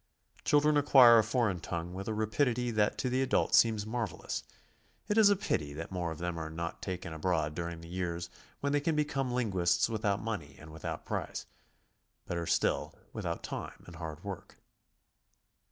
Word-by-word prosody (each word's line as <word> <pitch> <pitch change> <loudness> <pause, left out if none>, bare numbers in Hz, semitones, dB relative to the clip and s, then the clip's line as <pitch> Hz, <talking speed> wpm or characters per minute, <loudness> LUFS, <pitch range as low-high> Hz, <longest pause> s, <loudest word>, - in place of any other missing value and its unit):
Chil 145 -1 +4
dren 150 0 +3
acquire 130 -5 +8
a - - +4
foreign 110 -5 +1
tongue 85 +1 -4
with 95 +1 -6
a 110 - -1
rapidity 120 +3 +1
that 105 -2 +1
to - - -1
the 130 +1 +1
adult 135 0 +1
seems 110 -3 +5
marvelous; 115 -2 -3 0.7
it 210 - +1
is 220 -2 +7
a 205 - +5
pity 75 - -1
that 80 +4 -6
more 90 -2 -2
of 80 - -5
them 85 0 -3
are 80 -1 -4
not 85 +1 -5
taken 90 -3 -4
abroad 80 -2 0
during 85 0 -4
the 85 - -10
years 85 -1 -3 0.3
when 140 - 0
they 145 - +2
can 160 +2 +1
become 135 -4 0
lin 120 -4 0
guists 90 +1 +2
without 105 -2 0
money 105 -10 -4
and 80 +1 -12
without 80 -1 -6
price, - - -3 0.4
— - - -47
"better 85 -1 -2
still, - - +1 0.2
with - - -4
out 85 - -3
time - - -6
and 85 -2 -11
hai 80 -2 -5
d 80 - -21
work. 100 -3 -7
100 Hz, 195 wpm, -31 LUFS, 85-125 Hz, 0.7 s, acquire